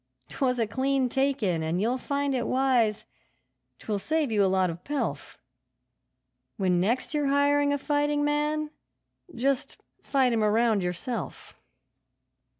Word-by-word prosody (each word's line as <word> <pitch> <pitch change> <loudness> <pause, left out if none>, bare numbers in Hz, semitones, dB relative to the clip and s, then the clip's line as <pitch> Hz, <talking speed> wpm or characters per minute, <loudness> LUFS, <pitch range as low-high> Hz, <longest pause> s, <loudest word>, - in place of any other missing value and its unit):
'Twas 255 -2 0
a 230 - +1
clean 265 +4 0
take 270 0 0
in, 175 -5 +1
and 160 +3 -1
you'll 240 +6 0
find 280 +1 -1
it 245 -2 -1
wise 250 -5 +1 0.7
'twill 210 -2 -3
save 305 +4 -1
you 210 -2 +3
a 190 - +3
lot 185 -2 +2
of 170 +2 -10
pelf 290 -1 -4 1.2
When 180 -3 +1
next 235 +10 0
you're 295 -2 0
hiring 285 +1 +3
a 285 - +1
fighting 290 0 0
man, 300 +1 0 0.6
just 265 +2 -1 0.2
fight 260 -3 +1
him 225 - +1
a 210 - +3
round 220 -1 +2
yourself.' 180 +7 -5
255 Hz, 145 wpm, -27 LUFS, 210-285 Hz, 1.2 s, you